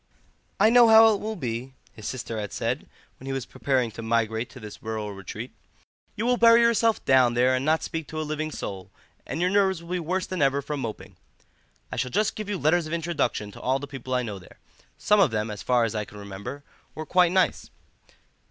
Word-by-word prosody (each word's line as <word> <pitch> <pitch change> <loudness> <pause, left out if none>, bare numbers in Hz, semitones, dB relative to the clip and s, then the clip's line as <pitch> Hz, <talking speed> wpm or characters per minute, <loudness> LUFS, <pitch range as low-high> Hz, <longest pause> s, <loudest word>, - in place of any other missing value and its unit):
"I 220 - +5
know 240 -1 +7
how 220 0 +8
it 200 - -2
will 220 +1 -4
be," 125 - -4 0.2
his 110 - -8
sister 115 -3 -4
had 105 -2 -5
said - - -3 0.3
when 130 - -10
he - - -2
was 135 -2 -3
preparing 130 -5 -1
to 115 - -8
migrate 110 0 0
to 130 - -12
this 105 -2 -10
rural 110 -2 -4
retreat; 100 -2 -7 0.6
"you 220 - -2
will 245 0 +2
bury 230 0 +7
yourself 230 -1 +2
down 130 -2 +4
there 125 +2 +3
and 130 0 0
not 155 +2 +2
speak 160 -2 -4
to 155 - -5
a - - -1
living 155 0 -3
soul, 95 -10 -6 0.4
and 150 - -4
your 180 +1 +1
nerves 190 -4 +2
will 170 - -10
be 180 - 0
worse 180 +3 -2
than 185 -4 -4
ever 140 0 +2
from 145 0 -4
moping. 115 -5 -7 0.7
I - - -5
shall 125 - -1
just 210 +8 0
give 215 -1 -6
you 205 - -1
letters 160 +1 +2
of 155 - -5
introduction 160 -11 -1
to - - -12
all 130 +1 +1
the 140 - -6
people 130 -2 -5
I 125 - +1
know 105 -4 -5
there. 90 - -17 0.4
Some 210 0 +3
of 190 -7 +5
them, 110 -1 -2
as 105 - -7
far 125 -2 +2
as 115 -1 -1
I 105 -1 -2
can 105 - -13
remember, 100 +8 -8 0.3
were 155 - -5
quite 180 +1 +3
nice." 185 0 +1
140 Hz, 225 wpm, -25 LUFS, 115-180 Hz, 0.7 s, how